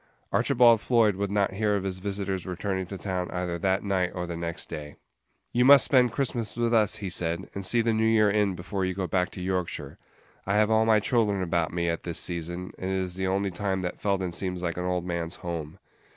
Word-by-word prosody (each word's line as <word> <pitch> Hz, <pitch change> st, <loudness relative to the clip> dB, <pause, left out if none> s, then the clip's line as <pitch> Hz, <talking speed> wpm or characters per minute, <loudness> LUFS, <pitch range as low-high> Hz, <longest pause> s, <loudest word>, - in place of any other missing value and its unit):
Archibald 120 Hz, -5 st, +4 dB
Floyd 115 Hz, -5 st, +3 dB
would 100 Hz, +1 st, -2 dB
not 100 Hz, -1 st, +1 dB
hear 105 Hz, +1 st, +1 dB
of 100 Hz, -, -1 dB
his 95 Hz, -1 st, -3 dB
visitor's 95 Hz, -1 st, -3 dB
returning 95 Hz, 0 st, -3 dB
to 95 Hz, -, -6 dB
town 90 Hz, 0 st, -3 dB
either 90 Hz, -1 st, -3 dB
that 95 Hz, +2 st, +1 dB
night 95 Hz, -3 st, 0 dB
or 90 Hz, -1 st, -3 dB
the 85 Hz, -1 st, -5 dB
next 85 Hz, 0 st, -4 dB
day. 75 Hz, -2 st, -7 dB, 0.6 s
"You 125 Hz, -, +3 dB
must 140 Hz, +1 st, +8 dB
spend 125 Hz, -3 st, +4 dB
Christmas 120 Hz, -4 st, -2 dB
with 120 Hz, 0 st, 0 dB
us," 110 Hz, -3 st, +3 dB
he 100 Hz, -2 st, -4 dB
said, 85 Hz, +1 st, -1 dB
"and 100 Hz, -, -5 dB
see 115 Hz, +5 st, +3 dB
the 115 Hz, 0 st, +1 dB
New 110 Hz, 0 st, +2 dB
Year 110 Hz, -1 st, +4 dB
in 105 Hz, -2 st, +1 dB
before 95 Hz, +2 st, -4 dB
you 95 Hz, 0 st, -1 dB
go 95 Hz, -1 st, -2 dB
back 90 Hz, +1 st, 0 dB
to 95 Hz, -, -7 dB
Yorkshire. 90 Hz, -2 st, -3 dB, 0.5 s
I 100 Hz, -, +1 dB
have 105 Hz, +1 st, +3 dB
all 110 Hz, 0 st, +3 dB
my 110 Hz, -1 st, +5 dB
children 105 Hz, -3 st, +1 dB
about 85 Hz, -2 st, 0 dB
me 85 Hz, 0 st, -1 dB
at 85 Hz, 0 st, -1 dB
this 85 Hz, -2 st, -3 dB
season, 85 Hz, +1 st, -3 dB
and 95 Hz, -, -3 dB
it 95 Hz, -, 0 dB
is 90 Hz, -1 st, -3 dB
the 95 Hz, +1 st, -2 dB
only 95 Hz, +1 st, 0 dB
time 95 Hz, +1 st, -2 dB
that 90 Hz, -, -4 dB
Felden 95 Hz, -3 st, 0 dB
seems 90 Hz, 0 st, -3 dB
like 85 Hz, -1 st, -2 dB
an 90 Hz, -, -2 dB
old 90 Hz, -1 st, -1 dB
man's 85 Hz, -1 st, -3 dB
home. 85 Hz, -1 st, -6 dB
95 Hz, 230 wpm, -27 LUFS, 90-105 Hz, 0.6 s, must